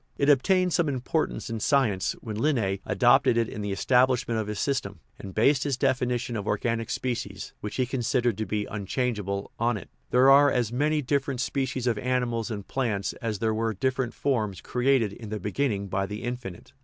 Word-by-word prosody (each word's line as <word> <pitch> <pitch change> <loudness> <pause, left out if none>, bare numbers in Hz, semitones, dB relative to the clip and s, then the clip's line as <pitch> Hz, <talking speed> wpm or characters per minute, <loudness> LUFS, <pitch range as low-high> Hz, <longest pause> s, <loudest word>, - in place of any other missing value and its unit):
It 140 - +2
obtained 180 +6 +3
some 170 -4 +2
importance 135 +4 -2
in 115 -1 -4
science 110 -7 +2
when 110 -2 -5
Linn6 110 -7 +1
adopt 130 +2 +4
ed 115 - +4
it 115 -1 +2
in 105 - -6
the 100 -1 -3
establishment 125 +1 +2
of 110 - -3
his 105 -1 -4
system, 100 -8 -2 0.2
and 95 - -7
based 135 +5 +3
his 140 -3 -1
definition 125 -2 0
of 105 -1 -4
organic 115 +2 -1
species 125 -1 -4
(which 105 - -5
he 130 - +1
considered 120 -2 0
to 110 - -2
be 105 -1 -1
unchangeable) 105 -1 -3
on 120 0 +1
it: 85 -8 -11
" - - -42
There 130 +2 +6
are 140 +1 +7
as 120 -4 0
many 150 +3 +1
different 135 -1 -1
species 130 -1 -1
of 115 -4 +1
animals 125 -2 -1
and 100 -3 -5
plants 105 -7 -1
as 110 -3 -2
there 110 +2 0
were 110 0 -1
different 130 +3 -1
forms 110 -8 -1
created 125 -4 +1
in 110 -1 -9
the 110 0 -3
beginning 105 0 -1
by 95 +1 -1
the 105 +2 -6
Infinite." 120 -7 -6
120 Hz, 195 wpm, -27 LUFS, 105-130 Hz, 0.2 s, are